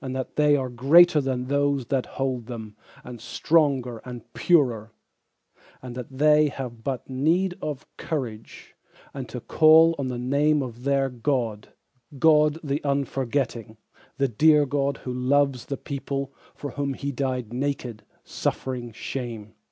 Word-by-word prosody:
That 130 -1 -4
they 150 -1 +4
are 130 -2 -3
greater 150 +7 +5
than 130 -2 -2
those 140 -1 0
that 135 -2 0
hold 130 -4 -2
them 110 -4 -8 0.3
And 120 -3 -9
stronger 135 -5 +1
and 120 -1 -10
purer, 120 -10 +2 0.9
That 125 -1 -7
they 150 +1 +5
have 125 -5 -7
but 130 -1 -3
need 165 +8 +1
of 145 -3 -5
courage, 120 -8 -6 0.4
and 130 -4 -6
to 125 - -6
call 160 +5 +5
on 135 - -1
the 125 -1 -3
name 140 +4 +2
of 125 0 -9
their 140 -1 +2
God, 120 -4 -2 0.4
God 150 0 +4
the 145 0 -2
unforgetting, 135 -5 -2 0.4
the 135 - +2
dear 150 +5 +4
God 140 0 -1
who 125 - -6
loves 130 0 +1
the 140 - -3
people 140 -1 -4 0.2
For 145 - -6
whom 140 -1 -3
he 140 +2 -4
died 130 -4 -3
naked, 125 -4 -3 0.2
suffering 125 -3 -3
shame. 115 -3 -6
135 Hz, 140 wpm, -25 LUFS, 125-145 Hz, 0.9 s, greater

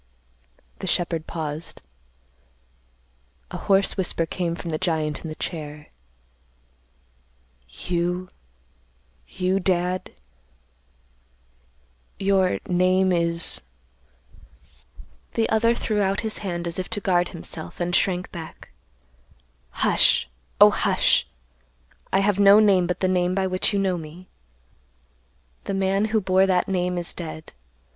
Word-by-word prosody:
The 190 - -5
shepherd 170 -2 -1
paused. 155 -1 -6 1.7
A - - -5
hoarse 195 0 +2
whisper 170 -3 0
came 170 +1 -3
from 170 -1 -6
the 155 - -2
giant 160 -4 -1
in - - -7
the 155 - -6
chair, 150 -3 -6 1.8
"You—you, 70 - -5
Dad, 180 0 -1 2.0
your—name 185 -1 +2
is—" 170 -1 +3 1.7
The 225 - +2
other 230 +1 +3
threw 215 -3 -1
out 195 0 0
his 220 -1 -4
hand, 175 -4 -4
as 170 +1 -3
if 185 - -4
to 225 - -2
guard 180 -3 +1
himself, 160 -1 -8
and 175 0 0
shrank 180 0 0
back; 165 -3 -10 1.0
"Hush, - - +3 0.3
oh - - +9
hush! - - +2 0.8
I 195 - +3
have 200 0 +1
no 200 +1 +7
name 195 -4 +4
but 180 - -3
the 185 - +2
name 180 0 +1
by 195 -1 +1
which 185 0 +1
you 205 - 0
know 190 -3 0
me. 165 +3 -11 1.4
The 195 - -2
man 195 +2 +1
who 220 0 +1
bore 190 0 +3
that 180 -1 +1
name 180 -2 -1
is 175 -1 -3
dead. 160 -2 -8
180 Hz, 115 wpm, -23 LUFS, 170-195 Hz, 2.0 s, oh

